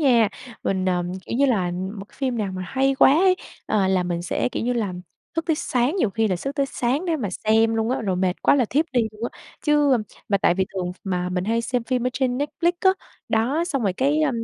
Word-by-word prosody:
nha. 240 -7 +4 0.3
Mình, 190 -1 0
ờ, 180 -1 +1 0.2
kiểu - - -2
như 280 +2 +4
là, 210 -9 +2
ừm, 185 +4 -4
một 195 - -6
cái - - -23
phim 255 -4 -1
nào 200 -3 -2
mà 185 0 -4
hay 270 +5 +1
quá 265 - +6
ấy, 365 +4 +4 0.3
à, 200 -3 +2
là 190 -1 +2
mình 175 -1 -2
sẽ, 180 - -1
kiểu - - -3
như 245 +1 0
là, 215 -6 -1 0.4
thức 330 0 -1
tới 320 -3 +2
sáng, 255 +4 0
nhiều 235 - +1
khi 220 +2 +1
là 185 - 0
sức 275 +10 -4
tới 280 -2 +1
sáng 270 +5 -1
để 335 -3 0
mà 230 -9 -3
xem 225 +3 +2
luôn 225 +1 0
á, 260 - 0
rồi 190 -4 -1
mệt 185 0 -1
quá - - +5
là 265 -3 +3
thiếp 285 +8 +1
đi 250 - +3
luôn 215 +2 -7
á, - - -17 0.2
chứ, 295 -2 +3
a - - +2 0.3
mà 200 - +2
tại 175 - +3
vì 190 +1 0
thường 180 -2 -2
mà 180 -2 -1
mình 180 0 -2
hay 230 +2 +1
xem 245 0 -1
phim 250 0 0
ở - - +1
trên 250 -1 0
Netflix 335 +4 0
á, 380 - +6 0.4
đó, 250 +9 +1
xong 285 -8 -2
rồi 200 -3 +1
cái, 280 +9 +1
a, 300 - +3
235 Hz, 265 wpm, -23 LUFS, 190-275 Hz, 0.4 s, quá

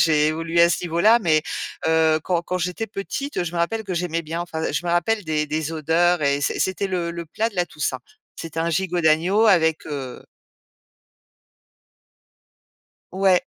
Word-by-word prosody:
j'ai 155 -2 +3
évolué 165 +2 0
à 170 - +7
ce 175 - -1
niveau 170 -1 -3
là. 220 +6 +5
Mais, 160 -6 +3 0.5
heu, 160 -1 +3
quand 175 -2 0
quand 185 +1 -3
j'étais 180 +5 -3
petite, 210 +4 -4
je 170 - -5
me 175 - -3
rappelle 220 +6 -1
que 190 -3 -4
j'aimais 170 -1 -2
bien, 165 +2 -4
enfin 160 -2 -3
je - - -2
me 175 - -1
rappelle 190 +6 +1
des 155 -1 -1
des 155 +1 -2
odeurs 165 +2 +2
et 140 0 +1
c'é - - -1
c'était 190 +1 -1
le 175 -2 -2
le 170 0 -6
plat 220 +8 -1
de 225 - -18
la 180 -1 +1
Toussaint. 150 -6 -3 0.3
C'était 165 -1 -7
un 165 +1 0
gigot 175 +1 0
d'agneau 175 +8 +3
avec, 160 -6 +3
heu 135 -4 -6 2.9
Ouais. 190 -1 +3
170 Hz, 180 wpm, -22 LUFS, 160-185 Hz, 2.9 s, à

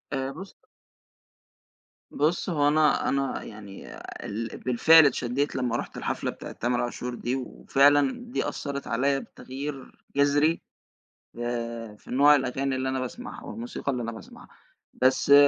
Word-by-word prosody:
آآ 135 0 -1
بُص 190 +4 -8 1.6
بُصّ، 160 +6 0
هُو 145 -4 +2
أنا 150 0 +3
أنا 140 0 -1
يعني 105 -2 -10 0.3
ال 110 +2 -4
بالفعل 155 +6 +6
اتشديت 135 +1 0
لما 125 -2 0
رُحت - - -6
الحفلة - - -2
بتاعة - - -9
تامر 120 +1 -1
عاشور 120 0 -3
دي، 120 +2 -2
وفعلًا 140 +2 +3 0.2
دي - - -1
أثّرت 140 -1 -5
عليَّ 135 +4 +1
بتغيير 135 +1 -7 0.2
جذري 145 +3 +3 0.8
آآ، 115 -2 -4
في - - -14
نوع 145 +3 +7
الأغاني 135 0 -1
اللي 130 0 -1
أنا 130 0 -1
باسمعها 230 - -6
والموسيقى 230 -10 -4
اللي 125 -2 -2
أنا 115 - -3
باسمعها، 115 - -12 0.5
بس 130 +2 +3
135 Hz, 135 wpm, -27 LUFS, 120-145 Hz, 1.6 s, نوع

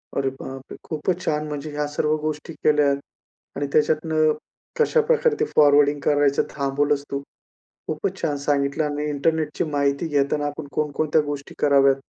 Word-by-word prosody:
अरे 135 -1 +1
बाप 135 0 -7
रे! - - -6
खूपचं 170 +3 -2
छान. 150 0 0
म्हणजे 150 0 -5
ह्या 145 0 -2
सर्व 150 +1 0
गोष्टी 155 +1 -4
केल्या 150 -2 +4 0.6
आणि 145 0 -2
त्याच्यातनं 155 0 +2 0.5
कशाप्रकारे 465 0 +3
ते 445 - +2
फॉरवर्डिंग 145 0 +5
करायचं 145 -1 +3
थांबवलंस 140 +1 0
तू, 140 - -2 0.7
खूपचं - - -2
छान 145 -1 0
सांगितलं 140 +1 0
आणि 150 0 -2
इंटरनेटची 150 +1 0
माहिती 140 +2 0
घेताना 145 0 +1
आपण 145 0 -6
कोणकोणत्या 155 +1 +1
गोष्टी 145 -1 -6
कराव्यात 140 -1 +5
145 Hz, 145 wpm, -23 LUFS, 140-155 Hz, 0.7 s, फॉरवर्डिंग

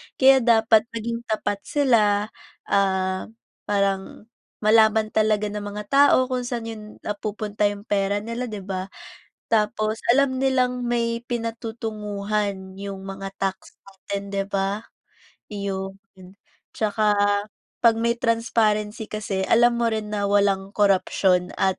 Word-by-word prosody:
kaya 265 0 +6
dapat 225 -2 +4
maging 230 +1 -3
tapat 210 -2 -1
sila, 215 -7 +2 0.4
ah, 190 -1 +1 0.4
parang 200 -1 -1 0.4
malaman 220 0 +4
talaga 215 -1 +1
ng 210 - -4
mga 205 +1 -6
tao 285 +1 +6
kung 250 -1 -1
saan 240 -2 -3
yun 215 -1 -8 0.2
napupunta 210 0 -2
yung 205 0 -5
pera 205 -1 0
nila, 230 +2 -4
'di 210 -4 -6
ba? 190 0 -4 0.6
Tapos 215 0 +1 0.2
alam 270 -1 +2
nilang 250 -2 +1
may 235 0 -1
pinatutunguhan 210 -4 -3
yung 195 -1 -6
mga 195 0 -7
tax 195 -1 -4
natin, 200 +1 -7
'di 195 0 -2
ba, 200 +2 -2 0.7
iyon. 195 -1 -4 0.8
Tsaka 210 -1 +1 0.6
'pag 230 -2 +5
may 235 +1 0
transparency 220 -2 0
kasi 195 -3 -3
alam 235 +1 +4
mo 235 - +1
rin 215 -2 -2
na 205 -1 -1
walang 200 -1 +1
korupsyon 185 -2 +2
at 190 -1 0
210 Hz, 125 wpm, -23 LUFS, 200-230 Hz, 0.8 s, kaya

